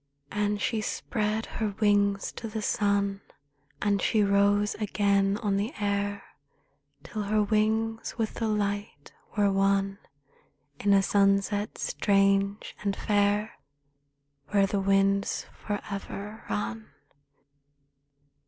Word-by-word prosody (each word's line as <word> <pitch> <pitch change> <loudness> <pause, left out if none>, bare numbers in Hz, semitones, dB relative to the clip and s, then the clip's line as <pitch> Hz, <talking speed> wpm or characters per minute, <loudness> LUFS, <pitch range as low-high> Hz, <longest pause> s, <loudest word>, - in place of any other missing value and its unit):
And 210 0 0
she 220 +1 0
spread 215 0 -2
her 210 -3 -3
wings 200 -2 +2
to 230 - -7
the 215 0 -4
sun, 200 -2 +1 0.6
And 200 -2 +2
she 215 -2 +3
rose 200 +1 +3
again 200 -1 +2
on 200 -2 +1
the 220 +9 -2
air, 200 -1 -1 0.8
Till 215 - -5
her 210 +1 +1
wings 220 +2 0
with 225 -2 -1
the 225 - -2
light 205 -1 -2 0.2
were 205 -1 +4
one 195 0 +1 0.8
In 200 - +2
a 195 -1 +5
sunset 200 +1 +2
strange 195 0 +1
and 200 -1 -1
fair, 205 +1 +1 0.9
Where 200 -1 +3
the 200 +1 -1
winds 195 0 +2
forever 205 +1 -6
run. 110 +1 -3
205 Hz, 110 wpm, -28 LUFS, 200-210 Hz, 0.9 s, a